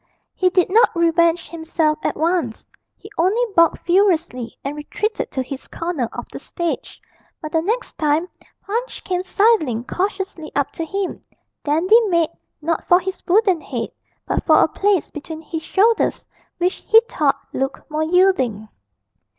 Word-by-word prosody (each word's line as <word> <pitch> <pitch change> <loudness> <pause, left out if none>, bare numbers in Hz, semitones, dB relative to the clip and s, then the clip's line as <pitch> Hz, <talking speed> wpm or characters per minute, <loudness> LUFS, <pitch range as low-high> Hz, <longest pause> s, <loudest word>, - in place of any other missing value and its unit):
He 370 - +2
did 365 0 +2
not 450 -1 +4
revenge 335 0 +2
himself 320 -2 0
at - - -1
once: 325 -8 -1 0.3
he 415 - -13
only 390 +8 +3
barked 335 -1 +3
furiously 345 - +1
and 280 +2 -4
retreated 420 +9 -3
to 260 - -2
his 265 +1 -8
corner 330 -9 -3
of - - -6
the - - -7
stage; 340 -2 -4 0.4
but 310 -2 -7
the 325 - +2
next 450 +8 -3
time 310 +2 +1 0.4
Punch 470 +5 -3
came 360 -1 -1
sidling 370 - +2
cautiously 380 - -3
up 285 -1 0
to 330 - -5
him, 390 +3 -3 0.4
Dandy 345 +10 +4
made, 335 -4 +2 0.3
not 330 +1 -1
for 355 - +5
his 380 +1 -5
wooden 380 -3 +3
head, 250 -5 -4 0.4
but - - -1
for - - +6
a - - +5
place 400 -4 0
between 315 +2 -7
his 320 0 -5
shoulders 435 +7 +2 0.3
which 360 +2 0
he 445 - +8
thought 285 -3 +1
looked 270 +1 -3
more 305 +1 -1
yielding. 315 - +2
335 Hz, 155 wpm, -20 LUFS, 305-385 Hz, 0.4 s, he